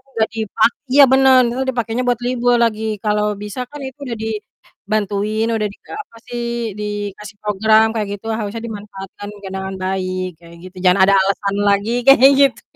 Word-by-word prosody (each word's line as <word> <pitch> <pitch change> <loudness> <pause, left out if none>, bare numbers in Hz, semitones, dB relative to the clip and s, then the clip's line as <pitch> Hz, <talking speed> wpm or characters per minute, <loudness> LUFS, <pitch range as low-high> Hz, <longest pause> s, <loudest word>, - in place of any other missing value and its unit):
nggak 220 -1 +1
dipak 220 0 +2 0.2
Iya 280 +2 +7
bener, 265 0 +6
entar 240 +2 -2
dipakenya 240 -1 -2
buat 245 -2 +1
libur 245 -1 +2
lagi, 220 -2 0 0.2
kalau 210 0 +1 0.2
bisa 210 +4 -6
kan 295 - -9
itu 265 - -11
udah 235 -3 -4
dibantuin, 215 0 -3
udah 215 -1 0
dika - - -17
apa 230 - -20
sih, 240 0 -4 0.4
dikasih 205 0 -5
program 215 +2 +4
kayak 215 -2 -1
gitu 205 - -16
harusnya 215 +1 -4
dimanfaatkan 205 -2 -9
juga 205 -1 -10
dengan 190 0 -4
baik 185 -1 -2
kayak 170 0 -15
gitu, 185 +1 -12
jangan 180 +1 +4
ada 195 - +5
alasan 195 +1 0
lagi 200 +2 +2 0.2
kayak 270 0 +8
gitu. 275 -2 +3
210 Hz, 170 wpm, -18 LUFS, 200-235 Hz, 0.4 s, kayak